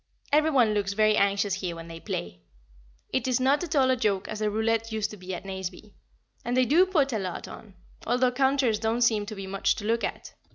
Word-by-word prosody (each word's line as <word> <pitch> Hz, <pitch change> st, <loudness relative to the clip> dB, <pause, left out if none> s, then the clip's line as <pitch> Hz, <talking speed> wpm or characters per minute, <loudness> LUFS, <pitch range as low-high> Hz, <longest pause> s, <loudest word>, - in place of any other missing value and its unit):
Every 305 Hz, +2 st, +4 dB
one 245 Hz, -7 st, +3 dB
looks 200 Hz, -2 st, -1 dB
very 215 Hz, 0 st, +3 dB
anxious 200 Hz, 0 st, +2 dB
here 185 Hz, -3 st, -3 dB
when 165 Hz, 0 st, -9 dB
they 165 Hz, 0 st, -9 dB
play; 90 Hz, -, -5 dB, 0.7 s
it 260 Hz, -1 st, 0 dB
is 255 Hz, -1 st, +1 dB
not 275 Hz, +5 st, +2 dB
at 330 Hz, -2 st, -3 dB
all 260 Hz, -2 st, +4 dB
a -, -, +3 dB
joke 205 Hz, -6 st, 0 dB
as 215 Hz, -, -5 dB
the 215 Hz, -1 st, +1 dB
roulette 225 Hz, +1 st, 0 dB
used 220 Hz, -1 st, -2 dB
to 210 Hz, -, -9 dB
be 185 Hz, 0 st, -6 dB
at 175 Hz, -, -9 dB
Nazeby; 190 Hz, +2 st, -7 dB, 0.5 s
and 245 Hz, +1 st, -1 dB
they 255 Hz, -, +4 dB
do 340 Hz, +9 st, +4 dB
put 290 Hz, -8 st, +1 dB
a 220 Hz, -, 0 dB
lot 185 Hz, -2 st, -5 dB
on, 205 Hz, -4 st, -12 dB, 0.3 s
although 250 Hz, +2 st, +2 dB
counters 265 Hz, -4 st, +2 dB
don't 225 Hz, +2 st, -1 dB
seem 215 Hz, -3 st, +2 dB
to 215 Hz, -, -6 dB
be 195 Hz, -1 st, -6 dB
much 195 Hz, 0 st, 0 dB
to 210 Hz, -, -7 dB
look 230 Hz, +2 st, 0 dB
at. -, -, -5 dB
220 Hz, 235 wpm, -27 LUFS, 195-255 Hz, 0.7 s, Every